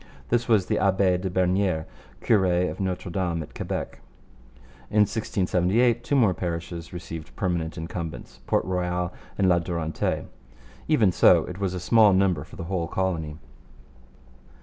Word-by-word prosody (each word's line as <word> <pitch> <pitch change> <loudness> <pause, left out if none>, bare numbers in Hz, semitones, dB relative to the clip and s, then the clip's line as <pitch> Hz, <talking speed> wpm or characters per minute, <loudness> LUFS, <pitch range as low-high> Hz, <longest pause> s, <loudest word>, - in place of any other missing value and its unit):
This 120 0 +1
was 105 -5 +3
the - - 0
Abbe 95 -2 +2
de 95 +1 -3
Bernieres, 90 -2 +1 0.4
cure 105 -4 +3 0.3
of - - -9
Notre 95 -1 -3
Dame 85 -3 -1
at - - -14
Quebec. - - -4 0.9
In 105 - +3
1678 105 +2 +1
two 145 - 0
more 115 -9 +4
parishes 85 -1 -5
received 85 -2 -8
permanent 85 -3 -2
incumbents 80 -1 -6
Port - - +1
Royal 90 -1 -1 0.2
and 95 - +3
La 90 -1 +4
Durantaye. 85 -2 -2 0.6
Even 115 -11 +4
so, - - +5
it 90 +1 -8
was 95 -2 -1
a - - -3
small 105 +2 +5
number 95 -6 +2
for - - -14
the - - -6
whole 85 -1 -2
colony. 80 -4 -2
90 Hz, 150 wpm, -25 LUFS, 85-100 Hz, 0.9 s, so